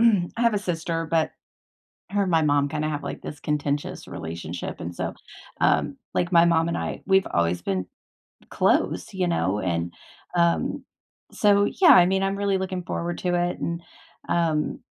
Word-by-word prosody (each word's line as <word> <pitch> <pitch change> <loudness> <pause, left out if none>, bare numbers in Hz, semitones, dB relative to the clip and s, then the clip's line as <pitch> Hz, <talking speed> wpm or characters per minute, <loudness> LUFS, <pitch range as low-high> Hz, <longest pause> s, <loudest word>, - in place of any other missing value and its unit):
I 220 -3 +2
have 235 -2 +3
a - - +2
sister, 165 -3 -2
but, 160 -1 +1 0.8
her 205 0 +1
and 190 - -1
my 165 - +4
mom 145 -2 +2
kinda 155 0 -1
have, 145 -1 -3
like, - - -5
this 150 - -7
contentious 145 -1 -2
relationship, 85 +1 -6
and 85 +1 -5
so, - - -3 0.5
um, - - +2 0.2
like, 175 +1 0
my 170 0 +6
mom 165 -1 +3
and 170 - -1
I, - - -4
we've 190 0 +4
always 85 0 +1
been 95 0 -2 0.7
close, 90 - +1
you 185 -1 0
know, 105 - 0
and, 85 -1 -1 0.4
um, 170 0 +1 0.5
so, 205 -1 +4
yeah, 360 - +3
I 175 - +8
mean, 190 +1 +1
I'm 195 0 0
really 200 -1 +1
looking 185 -1 -3
forward 170 +1 -3
to 180 -1 0
it 175 0 0
and, 170 0 -3 0.5
um, 160 -3 0
170 Hz, 175 wpm, -25 LUFS, 145-190 Hz, 0.8 s, I